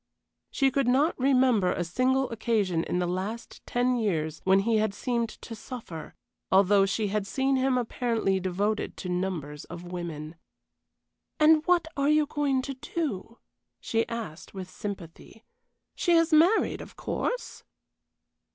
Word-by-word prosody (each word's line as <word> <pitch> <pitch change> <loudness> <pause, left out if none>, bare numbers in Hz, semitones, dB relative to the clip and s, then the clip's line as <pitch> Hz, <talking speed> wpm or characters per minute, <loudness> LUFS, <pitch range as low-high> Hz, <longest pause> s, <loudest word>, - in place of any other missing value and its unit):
She 270 -1 +2
could 275 -1 +1
not 275 +7 +3
remember 255 -7 +3
a 175 - -1
single 255 +9 +1
occasion 210 -7 0
in - - -1
the 180 - +1
last 190 +6 -4
ten 245 +1 +1
years 160 -9 -1
when 190 +1 +5
he 225 +2 +2
had 215 -2 0
seemed 235 -1 -1
to 225 - -10
suffer, 220 - -8 0.4
although 195 +1 +5
she 205 +1 -1
had 205 0 -1
seen 270 +4 +1
him 260 0 +2
apparently 230 -5 0
devoted 200 +4 -1
to 180 - -5
numbers 175 -5 -3
of 175 - -9
women. 165 -3 -6 1.0
"And 310 0 +6
what 350 -2 +3
are 280 0 +1
you 305 0 +4
going 285 -3 0
to 275 - -4
do?" 255 - -4 0.4
she 225 0 -1
asked, 215 -8 -6
with 185 -1 -7
sympathy, 200 +2 -8 0.5
"She 345 - +1
is 330 -1 +4
married, 340 +8 +4
of - - -11
course?" - - -3
225 Hz, 145 wpm, -27 LUFS, 185-265 Hz, 1.0 s, And